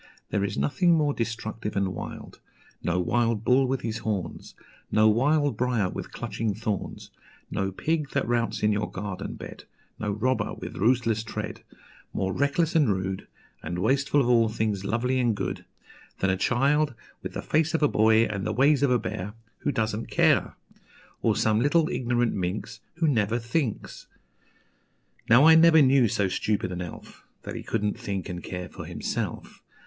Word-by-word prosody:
There 100 Hz, -, +1 dB
is 100 Hz, -, -2 dB
nothing 170 Hz, -, +3 dB
more 150 Hz, -2 st, +2 dB
destructive 115 Hz, -2 st, -4 dB
and 100 Hz, -1 st, +1 dB
wild, 95 Hz, -, -8 dB, 0.4 s
No 85 Hz, +1 st, 0 dB
wild 115 Hz, +3 st, +1 dB
bull 130 Hz, +3 st, +4 dB
with 130 Hz, 0 st, -1 dB
his 115 Hz, 0 st, -3 dB
horns, 100 Hz, -7 st, -4 dB, 0.4 s
No 110 Hz, 0 st, +5 dB
wild 145 Hz, +4 st, +2 dB
briar 115 Hz, -5 st, 0 dB
with -, -, -6 dB
clutching 110 Hz, -3 st, -3 dB
thorns, 105 Hz, -2 st, -4 dB, 0.4 s
No 95 Hz, 0 st, -1 dB
pig 150 Hz, -, -1 dB
that 140 Hz, -, -1 dB
routs 120 Hz, -2 st, -1 dB
in 105 Hz, -, +4 dB
your 105 Hz, 0 st, -1 dB
garden 95 Hz, 0 st, -5 dB
bed, -, -, -10 dB, 0.3 s
No 105 Hz, -, -2 dB
robber 120 Hz, +6 st, -1 dB
with -, -, -8 dB
ruthless 115 Hz, 0 st, +2 dB
tread, 110 Hz, -, -6 dB, 0.5 s
More 95 Hz, 0 st, -1 dB
reckless 140 Hz, -, +1 dB
and 150 Hz, -7 st, +4 dB
rude, 95 Hz, 0 st, -3 dB, 0.3 s
And 85 Hz, +2 st, -4 dB
wasteful 140 Hz, +8 st, +2 dB
of 120 Hz, -, 0 dB
all 115 Hz, -2 st, +4 dB
things 110 Hz, -3 st, -1 dB
lovely 125 Hz, +5 st, 0 dB
and 120 Hz, -3 st, +2 dB
good, 95 Hz, -2 st, -4 dB, 0.5 s
Than 95 Hz, -, +1 dB
a -, -, +1 dB
child, 140 Hz, +7 st, +1 dB, 0.3 s
with -, -, -6 dB
the -, -, -5 dB
face 160 Hz, +1 st, +1 dB
of 160 Hz, -, 0 dB
a -, -, +6 dB
boy 110 Hz, -2 st, +4 dB
and 100 Hz, -3 st, -4 dB
the 110 Hz, -, -1 dB
ways 140 Hz, +3 st, +4 dB
of 140 Hz, -, +3 dB
a 125 Hz, -, +4 dB
bear, 105 Hz, -3 st, -5 dB, 0.3 s
Who 145 Hz, -, -1 dB
doesn't 110 Hz, -2 st, -2 dB
care; -, -, +2 dB, 0.7 s
Or -, -, +2 dB
some 110 Hz, -1 st, +2 dB
little 155 Hz, +6 st, +3 dB
ignorant 120 Hz, -6 st, 0 dB
minx 100 Hz, +4 st, -3 dB, 0.2 s
Who 165 Hz, -1 st, +1 dB
never 115 Hz, -5 st, +1 dB
thinks. 120 Hz, +1 st, -3 dB, 1.2 s
Now 120 Hz, +6 st, +7 dB
I 160 Hz, -, +9 dB
never 160 Hz, 0 st, +7 dB
knew 130 Hz, -2 st, +5 dB
so 100 Hz, -1 st, 0 dB
stupid 95 Hz, 0 st, -1 dB
an 90 Hz, 0 st, -4 dB
elf, 90 Hz, -3 st, -9 dB, 0.2 s
That -, -, -6 dB
he -, -, -5 dB
couldn't 105 Hz, 0 st, -2 dB
think 100 Hz, -5 st, -4 dB
and 90 Hz, -1 st, -6 dB
care 90 Hz, -1 st, -5 dB
for -, -, -9 dB
himself. -, -, -4 dB
115 Hz, 175 wpm, -26 LUFS, 100-135 Hz, 1.2 s, I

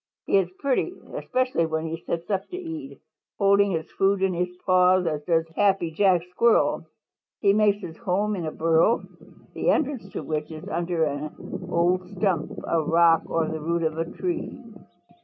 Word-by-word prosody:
He -, -, +3 dB
is 180 Hz, -2 st, -1 dB
pretty, 280 Hz, +6 st, 0 dB, 0.2 s
especially 255 Hz, -10 st, 0 dB
when 160 Hz, 0 st, -2 dB
he 165 Hz, 0 st, -3 dB
sits 170 Hz, 0 st, -3 dB
up 195 Hz, -1 st, -1 dB
to 360 Hz, -, -7 dB
eat, 325 Hz, -6 st, -7 dB, 0.4 s
holding 200 Hz, 0 st, +4 dB
his 160 Hz, -4 st, -3 dB
food 195 Hz, 0 st, +1 dB
in 190 Hz, -1 st, +2 dB
his 180 Hz, +1 st, -1 dB, 0.2 s
paws 185 Hz, 0 st, +4 dB
as 155 Hz, -3 st, -1 dB
does 165 Hz, -2 st, +2 dB
Happy 195 Hz, -5 st, +2 dB
Jack 180 Hz, +1 st, +3 dB
Squirrel. 230 Hz, +5 st, +2 dB, 0.5 s
He 200 Hz, -2 st, +4 dB
makes 210 Hz, -1 st, +3 dB
his 165 Hz, -, -7 dB
home 210 Hz, 0 st, 0 dB
in 170 Hz, -4 st, -4 dB
a -, -, -3 dB
burrow, 165 Hz, +8 st, +2 dB, 0.5 s
the -, -, 0 dB
entrance 280 Hz, -10 st, 0 dB
to -, -, -4 dB
which 150 Hz, -1 st, -3 dB
is 155 Hz, -1 st, -9 dB
under 170 Hz, -1 st, -1 dB
an 155 Hz, +5 st, -5 dB
old 180 Hz, +1 st, +1 dB
stump, 180 Hz, -5 st, 0 dB, 0.2 s
a 165 Hz, -, +2 dB
rock 165 Hz, +1 st, +4 dB
or 165 Hz, -1 st, 0 dB
the 160 Hz, -1 st, -4 dB
root 170 Hz, +2 st, -1 dB
of 160 Hz, 0 st, -1 dB
a 165 Hz, -, 0 dB
tree. 350 Hz, -3 st, -3 dB
180 Hz, 175 wpm, -25 LUFS, 165-200 Hz, 0.5 s, holding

